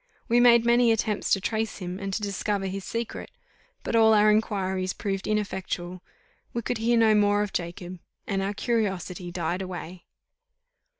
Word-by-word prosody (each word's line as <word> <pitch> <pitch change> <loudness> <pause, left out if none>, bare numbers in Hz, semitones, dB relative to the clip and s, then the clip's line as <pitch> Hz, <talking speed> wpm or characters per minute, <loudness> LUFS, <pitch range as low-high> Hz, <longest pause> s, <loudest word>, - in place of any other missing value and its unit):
We 240 -1 +3
made 235 -1 +6
many 235 0 +4
attempts 220 -2 -1
to 195 - +4
trace 220 +2 -2
him, 180 -1 -6
and 195 -1 -4
to 210 +2 -3
discover 200 0 -2
his 195 +1 -4
secret; 230 +4 -5 0.5
but - - -2
all 220 -1 +6
our 210 0 +5
inquiries 190 -3 0
proved 195 -2 -3
ineffectual: 190 -4 -3 0.5
we 235 - -3
could 245 +1 -2
hear 235 +1 +2
no 225 -1 +5
more 205 0 +3
of 205 - -6
Jacob, 175 +1 -5 0.3
and 195 -1 -1
our 200 +1 -2
curiosity 190 -6 -2
died 175 +1 -2
away. 180 -1 -7
205 Hz, 165 wpm, -26 LUFS, 185-220 Hz, 0.5 s, made